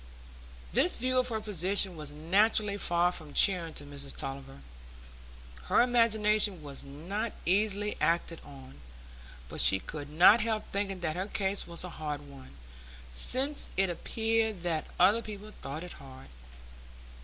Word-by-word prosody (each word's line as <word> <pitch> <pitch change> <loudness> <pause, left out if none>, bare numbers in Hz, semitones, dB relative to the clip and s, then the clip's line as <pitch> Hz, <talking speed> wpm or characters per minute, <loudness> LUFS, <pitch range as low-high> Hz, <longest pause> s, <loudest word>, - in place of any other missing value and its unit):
This - - +4
view 255 +1 +1
of 250 - 0
her 225 -3 -2
position 195 -2 0
was 150 -2 -7
naturally 200 +7 +1
far 175 0 +2
from 155 -5 -8
cheering 175 -5 +4
to - - -6
Mrs 140 -1 -7
Tulliver. 135 0 -7 1.0
Her - - +3
imagination 215 -6 +2
was 140 -2 -5
not 175 +11 -5
easily 205 +2 0
acted 170 0 0
on, 135 - -14 0.7
but - - -3
she 95 - +7
could 145 +7 -8
not 180 +9 +6
help 220 -1 -2
thinking 195 -2 -3
that 155 -2 -2
her 185 +2 -3
case 195 -1 -1
was 170 0 -5
a 180 - -7
hard 150 -1 -4
one, 135 - -15 0.5
since 265 - +3
it 190 -1 +2
appeared 220 0 -2
that 165 -3 -2
other 200 +6 +4
people 215 -1 -9
thought 150 +5 -6
it 180 - -9
hard. 130 - -14
180 Hz, 145 wpm, -29 LUFS, 150-210 Hz, 1.0 s, she